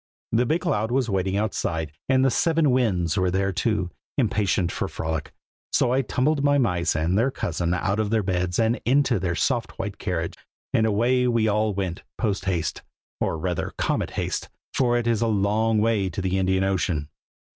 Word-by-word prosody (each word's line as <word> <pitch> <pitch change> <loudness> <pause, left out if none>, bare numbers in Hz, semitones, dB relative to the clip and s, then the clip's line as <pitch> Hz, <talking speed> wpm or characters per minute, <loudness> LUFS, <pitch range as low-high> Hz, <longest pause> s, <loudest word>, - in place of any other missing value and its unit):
The 120 +2 +2
big 165 +6 +1
cloud 105 +1 0
was 125 -2 0
waiting 95 0 0
outside, 80 -7 -1 0.2
and 130 0 +4
the 135 - +3
seven 160 -2 +2
Winds 95 -11 +1
were 90 0 +2
there, 95 +2 +1
too, 95 -1 -1 0.3
impatient 100 -7 +1
for - - -2
a - - -5
frolic; 80 -1 -3 0.4
so 120 - +2
I 135 - +3
tumbled 140 +4 0
my 145 0 +4
mice 90 -10 +1
and 80 +4 +1
their 115 +6 +3
cousin 85 -8 -2
mouse 90 +1 -1
out 100 +2 +1
of 110 -1 0
their 110 -1 +1
beds 90 -1 -1
and 115 +1 +1
into 130 -3 +3
their 90 -2 -1
soft 120 +4 -1
white 100 0 -4
carriage, 85 -4 -2 0.4
and 110 - +3
away 120 +4 +2
we 115 -2 +2
all 105 -1 +1
went 95 -3 -3 0.2
post 100 -5 -1
haste, 90 -4 -1 0.4
or 80 - 0
rather 90 +1 -3
comet - - 0
haste, - - -2 0.2
for 125 -3 +2
it 120 - -1
is 115 -2 +1
a 115 - +2
long 110 +1 +2
way 105 -3 +2
to 90 - -5
the 95 0 0
Indian 95 0 +2
Ocean. 90 -6 0
105 Hz, 195 wpm, -24 LUFS, 90-120 Hz, 0.4 s, and